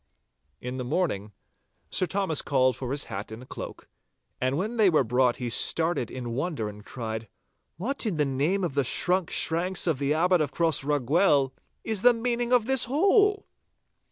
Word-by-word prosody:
In 125 +1 -5
the 130 - -3
morning, 120 - -2 0.6
Sir 185 - +2
Thomas 190 -4 -1
called 130 -2 +2
for 130 -1 -6
his 140 +2 -1
hat 100 0 -7
and 120 +4 -9
cloak, - - -8 0.5
and 130 +2 0
when 215 +7 -3
they 210 -4 +5
were 155 -5 +3
brought 125 +1 +1
he 125 - -4
started 160 +3 +2
in 125 -2 -6
wonder 135 -3 -2
and 105 0 -10
cried, 110 -2 -6 0.5
'What, 240 - -2
in 185 -7 -2
the 150 - +2
name 145 +9 0
of 170 -6 -2
the 140 0 +1
shrunk 180 +7 0
shanks 175 +3 +1
of 160 -6 0
the 145 +1 0
Abbot 180 +1 +3
of 145 -3 -1
Crossraguel, 145 -2 +2 0.3
is 220 -4 -1
the 245 +1 +6
meaning 240 +1 -2
of 245 -3 +4
this 265 0 +3
hole? 400 - +3
155 Hz, 175 wpm, -26 LUFS, 130-190 Hz, 0.6 s, the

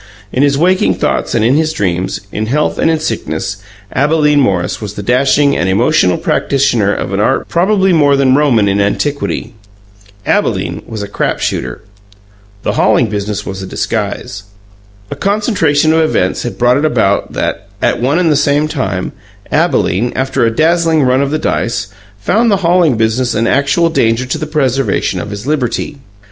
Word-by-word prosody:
In 130 - +1
his 140 -1 +3
waking 185 +4 +2
thoughts - - -1
and 110 -1 +2
in 120 - +3
his 155 +2 +1
dreams, 90 - -2
in 110 +1 -3
health 150 +6 0
and - - +2
in 160 -1 +1
sickness, 95 - -3 0.4
Abalene 150 +1 +2
Morris 95 -9 0
was 105 -1 -6
the 105 - -6
dashing 140 +5 +2
and 90 - 0
emotional 100 - +2
practitioner 120 -7 +1
of - - -3
an - - -1
art - - +1
probably 190 +1 +2
more 145 -3 +4
than 135 -2 +3
Roman 130 -7 +3
in 100 +1 +1
antiquity. 140 +8 -2 0.7
Abalene - - 0
was 110 -2 -5
a - - -5
crap 100 - -2
shooter. 65 -1 -3 0.8
The - - 0
hauling 115 -3 +2
business 105 0 -3
was 95 0 -6
a 95 - -6
disguise. - - -3 0.7
A - - -3
concentration 175 - +1
of 160 - +3
events 125 - 0
had 115 -6 -5
brought 125 +2 +3
it 145 - 0
about 110 -8 0
that, - - -3
at - - 0
one 135 +6 +1
and 175 -3 +2
the - - +3
same 145 +1 +2
time, 130 - -3 0.4
Abalene, 115 +7 +1
after 130 -1 0
a 115 - -2
dazzling 165 0 +2
run 130 +1 +2
of 140 - 0
the 155 - -1
dice, 115 -7 -2 0.3
found 220 - +1
the 200 - +3
hauling 170 -7 +3
business 115 +3 0
an 110 +2 +1
actual 140 +7 +2
danger 115 -4 +1
to 130 - -3
the 155 - -4
preservation 135 -3 0
of - - -7
his 100 +2 -7
liberty. 145 0 -2
135 Hz, 175 wpm, -13 LUFS, 110-155 Hz, 0.8 s, more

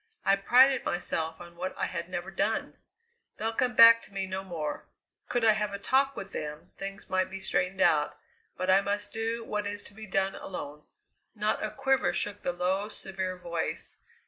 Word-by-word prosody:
I 195 - +5
prided 255 +6 +5
myself 160 -2 -2
on 170 0 -11
what 185 +2 -5
I - - 0
had 170 0 -4
never 185 +1 -4
done! 200 +4 -1 0.6
They'll 225 +1 -1
come 250 +1 0
back 230 0 +9
to - - -14
me 195 -1 -2
no 190 0 -4
more. 165 -5 -5 0.4
Could 240 -2 +1
I 220 - +8
have 210 -1 -1
a - - -3
talk 270 +6 +2
with 195 0 -7
them, 150 0 -6
things 195 0 -6
might 185 0 +1
be 195 0 -6
straightened 190 0 0
out; 150 -4 +3 0.4
but 185 - -2
I 190 +1 +6
must 205 +1 -2
do 225 +1 -2
what 210 -1 -2
is 205 0 -4
to - - -11
be 215 +1 -10
done 195 +1 +1
alone." 150 -5 -7 0.5
Not 215 0 0
a 215 - -1
quiver 270 +1 +1
shook 205 0 -2
the - - -1
low, 185 +4 -1
severe 190 -3 -4
voice. 170 -2 -4
195 Hz, 195 wpm, -29 LUFS, 180-215 Hz, 0.6 s, back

